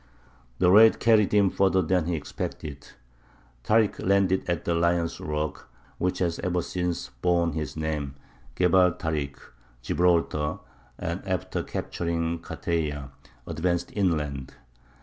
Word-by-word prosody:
The 90 -1 +4
raid 110 +3 +7
carried 110 -3 +4
him 100 -2 +4
further 95 -1 +2
than 90 0 +1
he 85 - 0
expected. 75 -2 -6 0.8
Tārik 110 - +2
landed 95 -1 +2
at 85 -3 -1
the 85 - +1
lion's 85 0 +1
rock, 75 0 -4 0.3
which 90 0 0
has 85 -2 -1
ever 90 -1 -1
since 90 -1 -3
borne 85 -1 +2
his 80 0 -4
name, 75 -3 -3 0.4
Gebal 90 -1 +4
Tarik, 75 -5 -3 0.5
Gibraltar, 80 -1 +1 0.4
and - - -3
after - - -2
capturing 85 -1 -2
Carteya, 75 -5 -3 0.3
advanced 85 +2 -1
inland. 75 -9 -1
85 Hz, 120 wpm, -26 LUFS, 80-90 Hz, 0.8 s, raid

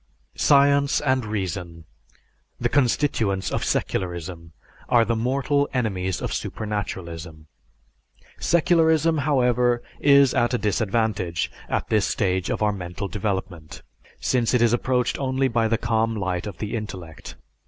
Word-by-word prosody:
Science 140 0 +4
and 130 -3 +1
reason, 90 -5 -4 0.8
the - - 0
constituents 115 -8 +1
of - - -1
secularism, 85 -2 -3 0.4
are 115 -1 +4
the 115 +2 0
mortal 140 +5 0
enemies 95 -7 -1
of - - -2
supernaturalism. 85 -7 -5 0.9
Secularism, 165 -2 +3
however, 125 -4 +2 0.2
is 140 -2 +5
at 120 +1 +1
a - - +2
disadvantage 105 -4 -1 0.2
at - - -2
this 105 -3 +2
stage 95 -3 0
of - - -1
our 105 -1 +2
mental 90 +1 -5
development, 95 -6 -4 0.4
since 125 -1 +1
it 125 - +3
is 120 -1 +3
approached 125 0 0
only 135 0 +1
by 115 -2 +1
the 115 0 +1
calm 115 -1 0
light 95 -2 -2
of 100 -5 -7
the 105 +3 -4
intellect. 95 -7 -7
110 Hz, 130 wpm, -23 LUFS, 95-130 Hz, 0.9 s, is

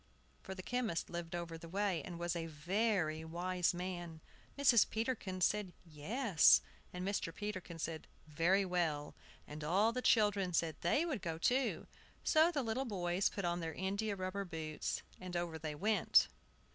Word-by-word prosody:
(For 190 - -7
the 185 - -7
chemist 235 -8 -2
lived 170 0 -4
over 170 -1 -5
the 165 - -10
way, 195 -1 0
and 175 - -7
was 175 0 -2
a 165 -1 -3
very 165 0 0
wise 175 +2 0
man.) 175 -2 -5 0.4
Mrs. 265 -6 +5
Peterkin 220 -5 -2
said, 200 -1 +1
"Yes," 175 - +4 0.3
and 180 +1 -4
Mr. 200 -4 -1
Peterkin 185 -3 -5
said, 160 0 -4 0.2
"Very 170 +6 +2
well," 165 -5 -1 0.3
and 150 +1 -8
all 195 +8 +3
the 250 +2 -2
children 205 -6 +3
said 165 -1 +1
they 275 - +2
would 280 - -2
go 165 -3 -3
too. 250 +9 +1 0.4
So 315 +1 +5
the 290 -5 -1
little 235 +4 -1
boys 185 -3 0
put 200 - -4
on 175 0 0
their 165 -1 -4
india 200 +3 -1
rubber 185 +1 -3
boots, 160 -4 -4 0.2
and 185 -1 -7
over 170 -2 -3
they 155 -2 -4
went. 210 +8 +4
180 Hz, 165 wpm, -36 LUFS, 165-205 Hz, 0.4 s, Mrs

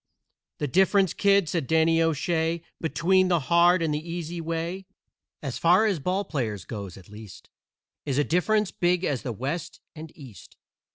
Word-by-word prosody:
"The 150 - -2
difference, 190 +4 +3
kid," 200 -3 +3
said 160 -5 -2
Danny 160 0 +3
O'Shay, 165 +1 0 0.2
"Between 185 +3 +2
the 175 -2 +2
hard 170 +4 +3
and 155 -2 0
the 150 - -1
easy 170 +1 -6
way, 165 +3 -4 0.6
As 135 -4 -4
far 180 +6 +4
as 200 -7 0
ball 185 +7 -1
players 110 - -3
goes, 100 -5 -7
at 95 - -15
least, 105 -2 -13 0.5
Is 140 -3 -2
a 145 - +3
difference 205 +6 +1
big 175 +1 0
as 140 -8 -1
the 125 - -4
West 140 - -5 0.2
and 155 0 -9
East. 130 - -14
165 Hz, 165 wpm, -25 LUFS, 145-180 Hz, 0.6 s, far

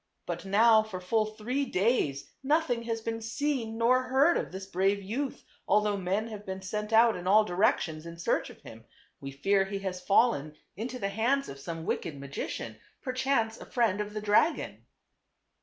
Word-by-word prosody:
But - - -5
now 220 +3 +5
for 215 -4 -6
full 215 +4 +1
three 220 +6 -2
days 185 - 0
nothing 290 -3 +1
has 225 -1 -2
been 225 0 -3
seen 230 -1 -2
nor 245 +3 +4
heard 270 +6 +4
of - - -2
this 190 +1 -6
brave 195 +2 0
youth, 255 +8 -4 0.2
although 210 +1 +3
men 195 +3 -1
have 210 -2 -8
been 190 -1 -6
sent 210 +3 -4
out 225 +1 +6
in 180 0 -6
all 210 +3 +6
directions 175 - 0
in 170 0 -9
search 170 - 0
of - - -14
him. - - -12 0.3
We 135 - -6
fear 195 +9 +1
he 200 +1 -4
has 180 -1 -3
fallen 180 - +2 0.2
into 240 +6 -5
the 195 -5 -2
hands 245 +7 0
of 140 - -8
some 165 +2 -6
wicked 155 -6 -3
magician, 135 -5 -5 0.3
perchance 255 -3 0
a - - -9
friend 225 -5 +1
of 210 0 -6
the 215 - -2
dragon." 210 +10 +1
210 Hz, 180 wpm, -29 LUFS, 190-235 Hz, 0.3 s, out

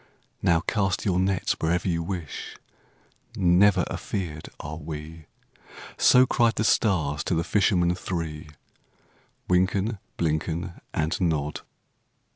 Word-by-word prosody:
"Now 85 -2 +3
cast 95 -2 0
your 90 -3 +2
nets 95 0 +1
wherever 85 +3 0
you 85 -2 0
wish,— 85 -4 -6 0.8
Never 90 0 +4
afeard 80 -6 -5
are 75 +1 -6
we!" 80 0 -8 0.7
So 125 +1 +6
cried 120 -3 +2
the - - 0
stars 90 -10 +2
to 90 - 0
the 80 - +1
fishermen 90 -4 +2
three, 80 -4 -5 1.0
Wynken, 95 +4 +1 0.2
Blynken, 85 +2 -2
And 80 +4 -1
Nod. 75 -4 0
85 Hz, 110 wpm, -26 LUFS, 80-95 Hz, 1.0 s, So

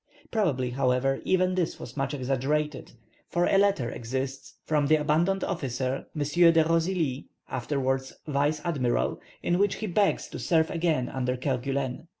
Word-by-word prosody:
Probably, 140 - +1
however, 130 +1 +1
even 185 0 +2
this 180 -3 -1
was 115 - -9
much 135 0 -1
exaggerated, 140 +3 -1 0.4
for 175 0 +1
a 195 - +4
letter 195 -13 +2
exists 130 +3 -4
from 150 -2 +1
the 155 - +5
abandoned 165 +6 +1
officer, 135 -6 -2
M. 150 - 0 0.3
de 165 -1 +4
Rosily 165 -5 0 0.2
(afterwards 130 0 -1
vice 150 0 0
admiral), 130 -8 0 0.2
in 175 +1 +1
which 205 -1 +2
he 220 - -4
begs 200 +1 +1
to - - -7
serve 160 -2 +2
again 160 -7 +1
under 125 -1 -2
Kerguelen. 135 +2 -2
145 Hz, 150 wpm, -27 LUFS, 130-170 Hz, 0.4 s, the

